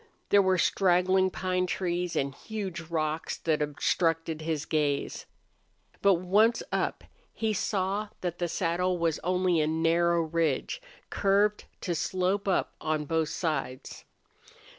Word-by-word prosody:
There 205 Hz, -, +6 dB
were 190 Hz, -1 st, +2 dB
straggling 185 Hz, +1 st, +3 dB
pine 185 Hz, 0 st, -1 dB
trees 175 Hz, -1 st, -2 dB
and 140 Hz, 0 st, 0 dB
huge 195 Hz, -1 st, -5 dB
rocks 160 Hz, -1 st, -2 dB
that 155 Hz, -2 st, 0 dB
obstructed 160 Hz, +2 st, 0 dB
his 155 Hz, -1 st, -2 dB
gaze. 150 Hz, -3 st, -1 dB, 0.7 s
But 200 Hz, -1 st, +5 dB
once 205 Hz, +7 st, +3 dB
up -, -, -1 dB, 0.3 s
he 220 Hz, -1 st, -1 dB
saw 200 Hz, +1 st, -1 dB
that 175 Hz, -1 st, -3 dB
the 175 Hz, -, 0 dB
saddle 180 Hz, +2 st, 0 dB
was 165 Hz, -2 st, 0 dB
only 180 Hz, -2 st, +1 dB
a 150 Hz, -, +1 dB
narrow 165 Hz, +1 st, +2 dB
ridge, 160 Hz, -, -1 dB, 0.3 s
curved 205 Hz, +1 st, +2 dB, 0.2 s
to 175 Hz, -, -1 dB
slope 185 Hz, +4 st, -1 dB
up 190 Hz, -, +1 dB
on 155 Hz, -1 st, -1 dB
both 160 Hz, 0 st, 0 dB
sides. 135 Hz, -7 st, -3 dB
175 Hz, 130 wpm, -28 LUFS, 160-190 Hz, 0.7 s, There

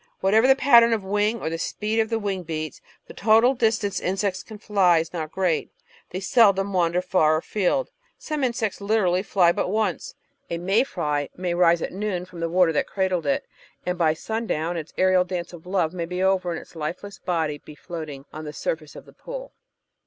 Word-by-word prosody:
Whatever 215 Hz, +6 st, +4 dB
the 270 Hz, -, +6 dB
pattern 235 Hz, -4 st, +6 dB
of 215 Hz, -3 st, -1 dB
wing 210 Hz, +4 st, 0 dB
or 160 Hz, -, -3 dB
the 165 Hz, -, -3 dB
speed 215 Hz, +6 st, -2 dB
of 220 Hz, -1 st, +1 dB
the 225 Hz, -, 0 dB
wing 200 Hz, -3 st, -2 dB
beats, 155 Hz, -2 st, -5 dB, 0.2 s
the -, -, -12 dB
total 225 Hz, +4 st, +4 dB
distance 220 Hz, -5 st, 0 dB
insects 190 Hz, +1 st, -1 dB
can 215 Hz, -, -11 dB
fly 195 Hz, -5 st, +3 dB
is 165 Hz, +1 st, -2 dB
not 160 Hz, -3 st, -4 dB
great; 180 Hz, -4 st, 0 dB, 0.4 s
they 185 Hz, -, -4 dB
seldom 200 Hz, -1 st, +3 dB
wander 175 Hz, 0 st, +1 dB
far 155 Hz, -4 st, +3 dB
afield. 205 Hz, -, -1 dB, 0.3 s
Some 305 Hz, -3 st, -3 dB
insects 230 Hz, -5 st, -1 dB
literally 200 Hz, -3 st, +2 dB
fly 185 Hz, -3 st, +3 dB
but 175 Hz, -, -1 dB
once. 210 Hz, -3 st, -1 dB, 0.3 s
A 170 Hz, -, -2 dB
may 190 Hz, +7 st, +2 dB
fly 150 Hz, -, -2 dB
may 180 Hz, -1 st, -2 dB
rise 170 Hz, -1 st, +3 dB
at -, -, -4 dB
noon 190 Hz, -2 st, -3 dB
from 180 Hz, -2 st, -12 dB
the 165 Hz, 0 st, -1 dB
water 180 Hz, -1 st, +4 dB
that 145 Hz, -, 0 dB
cradled 185 Hz, -5 st, -1 dB
it, 140 Hz, -, 0 dB, 0.4 s
and 180 Hz, -, -1 dB
by 160 Hz, -3 st, +2 dB
sun 220 Hz, +6 st, -4 dB
down 165 Hz, +1 st, -1 dB
its 160 Hz, -2 st, -5 dB
aerial 185 Hz, -1 st, +4 dB
dance 180 Hz, -1 st, -5 dB
of 175 Hz, 0 st, -12 dB
love 180 Hz, -3 st, 0 dB
may 170 Hz, -2 st, -3 dB
be 180 Hz, +2 st, -2 dB
over 190 Hz, -2 st, +2 dB
and 165 Hz, -, -3 dB
its -, -, -16 dB
lifeless 175 Hz, +6 st, -5 dB
body 160 Hz, -5 st, -1 dB
be 150 Hz, -, -13 dB
floating 150 Hz, -5 st, -7 dB
on 155 Hz, -, -7 dB
the 150 Hz, -1 st, -7 dB
surface 155 Hz, -1 st, -4 dB
of -, -, -11 dB
the -, -, -17 dB
pool. -, -, -8 dB
185 Hz, 205 wpm, -24 LUFS, 165-210 Hz, 0.4 s, the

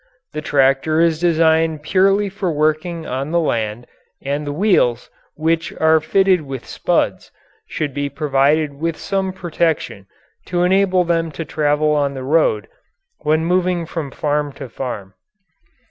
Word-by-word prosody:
The 155 Hz, -, -3 dB
tractor 140 Hz, +2 st, +2 dB
is 165 Hz, -2 st, +3 dB
designed 160 Hz, -2 st, +2 dB
purely 195 Hz, +4 st, +3 dB
for 195 Hz, -2 st, -3 dB
working 155 Hz, +2 st, -1 dB
on 135 Hz, +3 st, -3 dB
the 170 Hz, +1 st, +2 dB
land, 115 Hz, -6 st, -2 dB, 0.3 s
and 145 Hz, +2 st, -3 dB
the -, -, -2 dB
wheels, 150 Hz, -, +1 dB, 0.2 s
which 165 Hz, +1 st, 0 dB
are 160 Hz, 0 st, +5 dB
fitted 190 Hz, +2 st, +2 dB
with 135 Hz, -4 st, -7 dB
spuds, -, -, -1 dB, 0.4 s
should 150 Hz, -3 st, -3 dB
be 145 Hz, +1 st, -2 dB
provided 145 Hz, +1 st, +1 dB
with 165 Hz, 0 st, -2 dB
some 195 Hz, -1 st, -2 dB
protection 165 Hz, -, -2 dB, 0.4 s
to 175 Hz, -1 st, 0 dB
enable 185 Hz, 0 st, +3 dB
them 165 Hz, -1 st, 0 dB
to 165 Hz, -, -5 dB
travel 150 Hz, 0 st, +1 dB
on 145 Hz, -2 st, 0 dB
the 130 Hz, -, -5 dB
road 130 Hz, -7 st, +1 dB, 0.5 s
when 155 Hz, +1 st, +1 dB
moving 180 Hz, -1 st, +1 dB
from 160 Hz, -3 st, -5 dB
farm 145 Hz, +2 st, -1 dB
to 130 Hz, -, -9 dB
farm. 105 Hz, -6 st, -6 dB
155 Hz, 145 wpm, -19 LUFS, 145-170 Hz, 0.5 s, are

